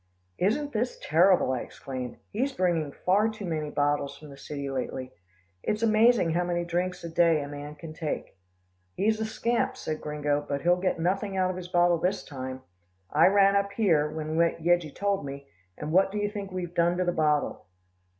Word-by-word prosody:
"Isn't 265 +10 +1
this 235 +3 -1
terrible," 175 -2 +4
I 130 - 0
exclaimed. 130 -1 -6
"He's 265 +6 -1
bringing 170 - 0
far 200 +8 +2
too 215 -2 -7
many 155 -3 -2
bottles 145 -1 0
from 150 -1 -12
the - - -10
city 140 0 -6
lately. 130 -1 -4 0.5
It's 210 - -1
amazing 220 -4 +4
how 175 +2 +1
many 175 -1 -1
drinks 180 +1 -2
a - - -4
day 165 -1 +4
a 145 - -4
man 145 +1 -7
can 155 +1 -9
take." 155 -9 -4 0.6
"He's 220 +2 +1
a - - 0
scamp," 240 +3 -1
said 155 0 -4
Gringo, 145 -1 -1
"but 140 -1 -2
he'll 175 +1 +3
get 185 - +1
nothing 190 +4 -1
out 185 0 +2
of - - -6
his 180 -1 -6
bottle 175 -1 +3
this 180 +2 0
time. 130 -2 -7 0.5
I - - +6
ran 200 0 +5
up 200 0 +1
here, 165 -9 +2
when 155 0 -4
Yeggie 170 -2 +2
told 200 -2 0
me, 140 0 -7 0.3
and 150 - -5
what 190 +3 +4
do 210 - -4
you 205 0 -1
think 200 -2 -6
we've 180 -2 -4
done 175 0 +2
to 185 - +1
the 175 - +2
bottle?" 150 - 0
175 Hz, 195 wpm, -27 LUFS, 150-195 Hz, 0.6 s, I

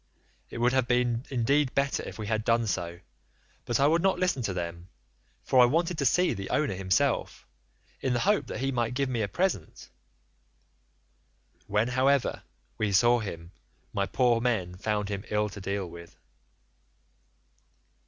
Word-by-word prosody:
It - - -8
would 120 +2 +2
have 130 -2 +2
been 120 0 +1
indeed 135 +2 +1
better 140 0 +1
if - - -8
we 110 - -5
had 110 0 -1
done 115 0 +2
so 85 -4 -3 0.6
but 120 - 0
I 140 - +4
would 165 +3 +3
not 195 +1 +2
listen 180 -8 0
to 110 - -2
them, 85 0 -5 0.5
for 130 - +3
I - - +8
wanted 165 +5 0
to 140 - +3
see 180 +6 +3
the 100 -3 -6
owner 150 -9 +1
himself, 95 -1 0 0.5
in 130 - 0
the 120 - 0
hope 205 +1 +2
that - - -5
he 135 0 0
might 120 -1 -1
give 135 0 0
me 120 -3 -1
a 105 - 0
present. 170 - -2 1.8
When, 105 +4 +1
however, 130 +2 +1 0.4
we 105 -1 0
saw 120 +5 +4
him 85 -5 -7 0.4
my 100 -1 0
poor 120 -3 +2
men 105 -8 -1
found 105 +1 -2
him 100 -1 -4
ill 105 0 0
to 100 0 -9
deal 100 0 -3
with. 85 0 -12
115 Hz, 165 wpm, -28 LUFS, 100-135 Hz, 1.8 s, I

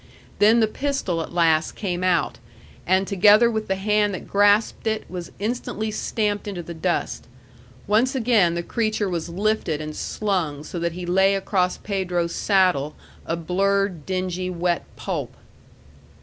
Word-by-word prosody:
Then 225 +3 +5
the 220 - +4
pistol 240 -9 -2
at - - -6
last 165 -2 +2
came 180 -3 -3
out, 175 -4 +1 0.5
and 190 +2 +3
together 210 +4 +5
with 220 -1 -3
the 190 - 0
hand 205 0 +1
that - - -8
grasped 205 +3 +3
it 220 0 -1
was 175 -1 -7
instantly 220 0 -3
stamped 210 -1 -2
into 185 -4 -4
the 170 - -7
dust. 170 +2 -2 0.6
Once 230 +6 +2
again 225 -9 +3
the 170 - -2
creature 215 0 -1
was 170 -2 -3
lifted 190 -4 -1
and 155 0 -6
slung 175 -9 -2
so 175 - -6
that 170 0 -1
he 180 +1 -6
lay 190 +2 +3
across 190 -2 0
Pedro's 180 -4 -2
saddle 180 -8 +2 0.3
a 165 - 0
blurred, 185 0 0
dingy, 185 -1 -2
wet 175 -1 0
pulp. - - -4
190 Hz, 150 wpm, -23 LUFS, 175-210 Hz, 0.6 s, Then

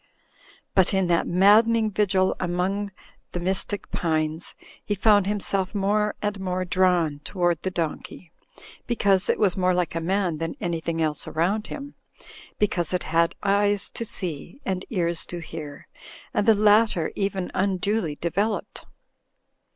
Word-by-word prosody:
But 190 0 +3
in 190 -1 +2
that 170 -1 +2
maddening 215 +4 +4
vigil 190 -2 +2
among 185 +3 -1 0.4
the 175 - -2
mystic 190 +2 -2
pines, 155 -1 -1 0.3
he 205 - -1
found 205 -1 +4
himself 195 -1 -1
more 210 +1 +1
and 205 -1 -1
more 185 -1 -2
drawn 175 -5 +2
toward 175 -4 0
the 190 - -1
donkey, 170 0 -5 0.6
because 200 -5 +2
it - - +3
was 195 -4 +2
more 185 -1 +2
like 180 -2 0
a 165 - -1
man 180 -2 0
than 165 0 -3
anything 165 -1 -2
else 150 -1 -1
around 195 +7 0
him; 285 0 -7 0.6
because 180 -4 +1
it 180 - -2
had 170 +1 +3
eyes 205 0 +2
to - - -3
see, 185 - -5
and 190 -1 -2
ears 170 - 0
to 175 - -5
hear 155 -3 -8 0.2
— - - -18
^and 205 - +1
the 225 - +7
latter 210 -4 +3
even 195 -2 -2
un 190 0 +1
duly 185 -5 -1
developed. 200 +7 -2
185 Hz, 150 wpm, -25 LUFS, 170-205 Hz, 0.6 s, the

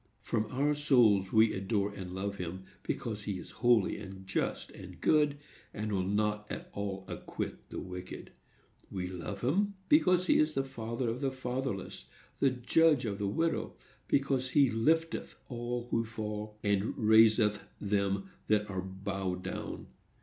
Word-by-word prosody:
From 110 -2 0
our 140 +5 +2
souls 120 -10 +4
we 110 0 +5
adore 100 +1 0
and 95 -3 -7
love 100 +2 -3
him, 90 +1 -5 0.2
because 105 -3 -3
he 100 -3 -2
is 90 - -9
holy 120 -5 +4
and 95 0 -9
just 95 - -2
and 90 -1 -11
good, 150 - +3 0.4
and 105 0 -3
will 95 -2 +1
not 105 +2 0
at - - -6
all 95 -1 -4
acquit - - -5
the - - -5
wicked. 90 0 -7 0.6
We 95 -2 -3
love 95 +2 -5
him 200 +11 +1
because 185 - +5
he - - +4
is 155 0 +2
the 135 - +2
father 120 -2 -4
of 115 +3 -2
the 135 - +2
fatherless, 130 -5 -4 0.3
the 135 - +5
judge 130 +3 +3
of 100 -2 -3
the 100 - 0
widow;—because 135 0 -1
he 135 -2 +4
lifteth 160 +9 +1
all 120 -1 -3
who 115 - +2
fall, 105 -1 -5
and 100 0 +1
raiseth 110 -1 +5 0.2
them 100 -1 0 0.2
that 105 -1 +2
are 95 -1 -2
bowed 95 -1 -4
down. - - -5
110 Hz, 155 wpm, -32 LUFS, 100-130 Hz, 0.6 s, we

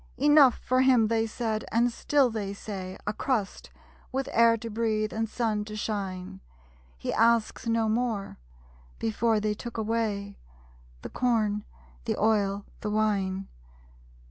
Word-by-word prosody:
'Enough 290 -2 +6
for 255 0 +2
him,' 250 -4 +4
they 225 0 +1
said 220 -1 -2
and 240 +2 +3
still 275 -2 +2
they 200 -3 -4
say 190 -3 -6
'A 210 - -1
crust, 215 -4 -2 0.4
with 265 0 -2
air 230 0 +5
to 230 - -7
breathe, 215 -1 -1
and 225 0 -2
sun 220 -3 -1
to 215 0 -8
shine; 190 - -4 0.6
He - - -3
asks 230 0 +2
no 230 -1 +2
more!' 220 - -1 0.6
Before 220 - +1
they 210 0 0
took 235 +2 -8
away 215 -2 -2 0.6
The - - -5
corn, 215 -4 0 0.4
the - - -1
oil, 205 -2 +1
the 210 - -3
wine. 195 -3 0
220 Hz, 140 wpm, -27 LUFS, 205-230 Hz, 0.6 s, Enough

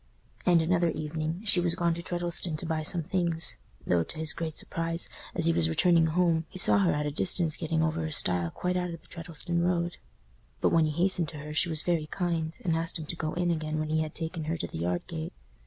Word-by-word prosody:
And 170 -2 +5
another 170 0 +2
evening 155 +4 -3
she 195 -4 +8
was 175 -1 +2
gone 170 -2 +1
to 170 - -5
Treddleston 175 -1 -2
to 160 - -5
buy 160 -1 -1
some 165 +2 +2
things; 170 -1 -1 0.3
though, 85 -1 +2
to 85 - -5
his 155 -1 +1
great 160 -1 -4
surprise, 165 0 -1 0.3
as 165 - +1
he 165 - +4
was 80 - +1
returning 165 - +4
home, 165 -1 +1
he - - -9
saw 190 - +5
her 185 -3 +3
at 150 0 -1
a 150 - -1
distance 165 0 +2
getting 160 -1 0
over 160 0 0
a 160 - -3
stile 90 - +2
quite 180 - -2
out 180 -1 -1
of 165 -1 -7
the - - -24
Treddleston 170 0 -4
road. 175 0 0 0.6
But, - - +3
when 165 -1 +4
he 155 +3 0
hastened 180 -4 +2
to 155 - -8
her, 150 +1 -7
she 160 +3 +3
was 160 -2 +1
very 165 -3 0
kind, 165 -3 -2
and 165 -2 +2
asked 165 +1 +1
him 160 - -6
to 170 - -4
go 155 -2 -3
in 175 0 +1
again 155 -1 -2
when 155 0 -2
he 155 0 +1
had 155 -1 -4
taken 160 -1 -4
her 165 +2 -2
to - - -2
the - - -7
yard 90 +1 -1
gate. 160 -1 -6
165 Hz, 245 wpm, -28 LUFS, 155-175 Hz, 0.6 s, she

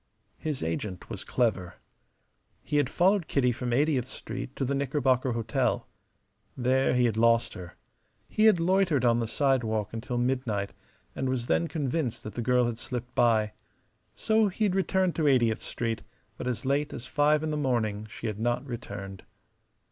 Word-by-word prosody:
His 150 - -3
agent 90 +3 -4
was - - -5
clever. 105 -8 0 0.9
He 150 - -1
had 145 - +2
followed 185 0 +2
Kitty 125 -3 +2
from 120 +1 -3
Eightieth 135 -1 +2
Street 130 +3 -6
to 135 - -1
the 135 - -1
Knickerbocker 135 -2 +1
Hotel. 115 -1 0 0.7
There 130 +1 +2
he 125 0 +4
had 110 -2 0
lost 115 +1 +3
her. 90 -3 -9 0.5
He 215 - +2
had 215 -6 +6
loitered 170 -6 +2
on 120 0 +4
the 115 - -1
sidewalk 115 -6 0
until 120 +2 -3
midnight, 120 -5 -1 0.4
and 130 - -1
was 130 -2 -1
then 170 - +1
convinced 145 -5 -2
that 110 - -7
the 120 - -3
girl 125 +1 +3
had 120 -1 -3
slipped 125 0 -5
by. 110 -3 +3 0.6
So 220 -1 +2
he 200 +3 -2
had 200 -3 +2
returned 190 -1 +1
to 155 -2 +2
Eightieth 120 -4 +3
Street; 115 -2 -3 0.3
but - - -6
as 125 +2 -3
late 140 +2 0
as 120 - -7
five 150 +3 +2
in 155 - -1
the - - -1
morning 115 -7 -1
she 110 - -9
had 110 -2 -3
not 120 +3 0
returned. 100 -6 -7
125 Hz, 170 wpm, -28 LUFS, 115-145 Hz, 0.9 s, had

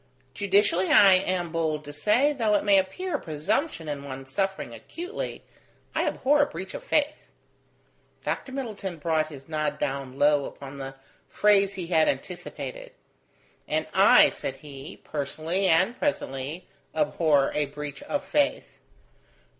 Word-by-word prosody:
"Judicially, 200 -1 +2
I 195 -2 +8
am 185 -2 +1
bold 155 -2 -1
to 145 - -8
say, 240 - +3
though 225 -6 +1
it - - +1
may 200 -1 +5
appear 295 - -2
a - - -13
presumption 165 - -2
in 145 -1 -4
one 135 -1 -7
suffering 190 -1 -2
acutely, 345 - -6 0.5
I - - 0
abhor 290 +2 +3
a 285 - +3
breach 190 -8 -7
of - - -7
faith." 300 0 0 1.0
Dr. 270 - -3
Middleton 215 -9 -5
brought 155 0 0
his 140 -3 -11
nod 155 -2 -1
down 135 -2 -3
low 145 -1 +4
upon 140 0 -9
the 135 0 -6 0.3
phrase 200 -1 +3
he 180 -2 -4
had 160 -2 +3
anticipated. - - -5 0.7
"And - - 0
I," - - +7
said - - -4
he, 140 -1 -10
"personally, 160 +6 -2
and 185 +7 +3
presently, 150 - -3 0.3
abhor 155 - +2
a 150 -1 0
breach 145 0 -7
of 290 - -3
faith. 290 -1 0
170 Hz, 145 wpm, -26 LUFS, 145-210 Hz, 1.0 s, I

